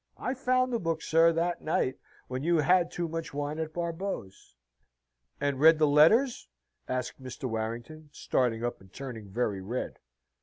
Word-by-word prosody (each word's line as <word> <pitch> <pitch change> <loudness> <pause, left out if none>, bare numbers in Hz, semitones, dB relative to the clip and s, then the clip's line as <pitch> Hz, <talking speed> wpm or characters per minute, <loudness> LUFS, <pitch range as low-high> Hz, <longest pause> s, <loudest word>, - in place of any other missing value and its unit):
I 255 - -2
found 255 -1 +1
the 235 - +1
book, 165 -3 -2
sir, 165 +1 +5
that 170 +1 -1
night, 130 -4 0 0.3
when 130 0 -4
you 170 +3 +2
had 175 +3 +4
too 175 -1 -3
much 165 -2 -5
wine 145 +2 -3
at 160 -1 -3
Barbeau's." 170 - -5 0.8
"And 140 -2 -1
read 160 +2 +7
the 155 - +4
letters?" 165 - +4 0.4
asked 130 +1 -3
Mr. 130 0 -9
Warrington, 120 +6 -4
starting 120 -5 0
up 120 - -4
and 95 -1 -18
turning 115 -6 -8
very 105 -2 -1
red. 115 +7 -4
150 Hz, 160 wpm, -29 LUFS, 125-170 Hz, 0.8 s, read